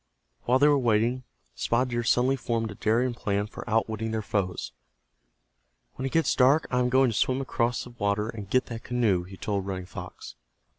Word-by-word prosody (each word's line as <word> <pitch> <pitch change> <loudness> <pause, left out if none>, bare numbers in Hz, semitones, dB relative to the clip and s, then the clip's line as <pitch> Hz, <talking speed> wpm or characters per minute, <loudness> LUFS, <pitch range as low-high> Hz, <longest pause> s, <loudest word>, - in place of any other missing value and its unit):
While 125 +2 +4
they 145 +2 +5
were 145 -1 +4
waiting, 120 +1 +1 0.3
Spotted 125 +2 0
Deer 120 0 0
suddenly 125 +3 +3
formed 115 -3 -2
a - - -6
daring 120 +5 +1
plan 100 -3 -1
for 105 - -9
outwitting 110 0 0
their 110 -1 -2
foes. 95 - -2 1.2
"When 130 - -4
it - - -5
gets 165 0 +2
dark 140 +5 +4
I 125 - +2
am 125 0 +2
going 130 -1 +4
to - - -5
swim 130 +5 +1
across 120 -2 -1
the 125 - -11
water, 105 -2 -1
and 105 -4 -7
get 130 +4 +2
that 115 -1 -7
canoe," 110 -8 +1
he 95 +1 -11
told 100 -1 -2
Running 95 -2 -4
Fox. - - -9
115 Hz, 195 wpm, -27 LUFS, 105-125 Hz, 1.2 s, they